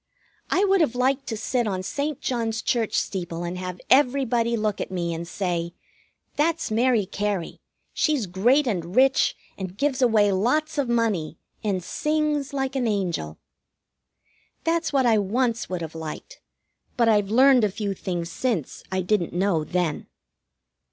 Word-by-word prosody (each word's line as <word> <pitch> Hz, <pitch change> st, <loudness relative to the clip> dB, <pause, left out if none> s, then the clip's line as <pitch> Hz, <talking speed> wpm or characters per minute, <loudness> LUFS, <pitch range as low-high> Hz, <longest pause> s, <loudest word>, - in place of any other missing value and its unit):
I 395 Hz, -, +3 dB
would 390 Hz, -2 st, +3 dB
have 250 Hz, -7 st, +1 dB
liked 260 Hz, +2 st, +1 dB
to 220 Hz, -, -3 dB
sit 240 Hz, +1 st, -1 dB
on 185 Hz, -2 st, -2 dB
St. 285 Hz, +7 st, -3 dB
John's 230 Hz, -3 st, -2 dB
Church 230 Hz, -3 st, 0 dB
steeple 175 Hz, -3 st, -3 dB
and 175 Hz, +1 st, -4 dB
have 180 Hz, -1 st, -5 dB
everybody 245 Hz, -3 st, +3 dB
look 215 Hz, -2 st, -1 dB
at -, -, -4 dB
me 175 Hz, -2 st, -2 dB
and 165 Hz, +1 st, -5 dB
say: 175 Hz, -2 st, -2 dB, 0.6 s
"That's 325 Hz, -2 st, +1 dB
Mary 230 Hz, -1 st, +2 dB
Cary! 200 Hz, -2 st, -3 dB, 0.3 s
She's 295 Hz, -8 st, +1 dB
great 235 Hz, +11 st, +3 dB
and 180 Hz, -5 st, -3 dB
rich, 265 Hz, +1 st, +4 dB, 0.2 s
and 190 Hz, 0 st, -6 dB
gives 280 Hz, 0 st, 0 dB
away 220 Hz, -5 st, +4 dB
lots 295 Hz, +11 st, +1 dB
of 265 Hz, -4 st, 0 dB
money 215 Hz, -10 st, 0 dB, 0.3 s
and 195 Hz, -4 st, -1 dB
sings 300 Hz, -, -1 dB
like 270 Hz, -1 st, -2 dB
an 255 Hz, -3 st, +1 dB
angel." 175 Hz, -, -2 dB, 1.3 s
That's 330 Hz, 0 st, 0 dB
what 270 Hz, -3 st, +2 dB
I 225 Hz, -3 st, +4 dB
once 230 Hz, +4 st, 0 dB
would 180 Hz, -2 st, -3 dB
have 160 Hz, -1 st, -6 dB
liked, 160 Hz, -, -8 dB, 0.6 s
but 235 Hz, -1 st, +3 dB
I've 205 Hz, -3 st, +3 dB
learned 255 Hz, +2 st, +5 dB
a 210 Hz, -, +3 dB
few 200 Hz, 0 st, -3 dB
things 175 Hz, -3 st, -4 dB
since 215 Hz, -, -2 dB
I 190 Hz, 0 st, 0 dB
didn't 180 Hz, -1 st, 0 dB
know 180 Hz, -3 st, +1 dB
then. 170 Hz, -1 st, -2 dB
220 Hz, 160 wpm, -24 LUFS, 185-260 Hz, 1.3 s, learned